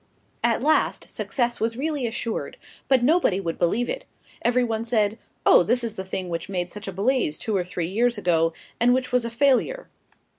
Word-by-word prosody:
At 235 +1 +2
last, 310 +2 +2
success 240 -2 -1
was 225 +1 -1
really 290 -3 -1
assured, 230 0 -4 0.3
but 260 -3 +3
nobody 280 - +3
would 170 -4 -4
believe 215 +8 +1
it. - - -4 0.4
Every 245 +1 +2
one 225 -2 -1
said, 220 -2 +1 0.3
"Oh, - - +7
this 240 +7 +1
is 225 -2 -3
the 190 - -4
thing 185 -1 -4
which 170 +2 -4
made 180 -2 -2
such 210 0 -7
a - - -3
blaze 200 - 0
two 220 - -2
or 185 - +1
three 175 -1 -3
years 235 +6 +1
ago, 165 -4 +2 0.3
and 245 +1 +4
which 255 0 -2
was 250 -1 +2
a - - -2
failure." 280 - +1
230 Hz, 195 wpm, -24 LUFS, 190-250 Hz, 0.4 s, Oh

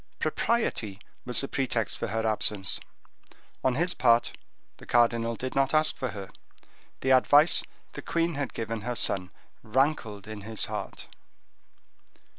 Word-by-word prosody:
Propriety 115 - 0 0.3
was 125 -1 -2
the 135 - -3
pretext 125 -6 -1
for - - -3
her 115 0 -2
absence. 105 -2 +1 0.8
On 130 -1 +2
his 175 +5 +1
part, 115 -2 +3 0.4
the - - -14
cardinal 115 -1 +2
did 130 +3 -4
not 135 +2 +2
ask 155 0 +3
for 130 - -3
her: 100 -5 -7 0.7
the 130 - +1
advice 145 +5 +6 0.3
the - - -6
queen 170 0 0
had 140 -3 -4
giver 115 0 -3
her 120 +3 -3
son 95 -4 -1 0.3
rankled 110 -4 0
in 110 -1 -7
his 110 +1 -1
heart. - - -6
120 Hz, 140 wpm, -28 LUFS, 110-135 Hz, 0.8 s, advice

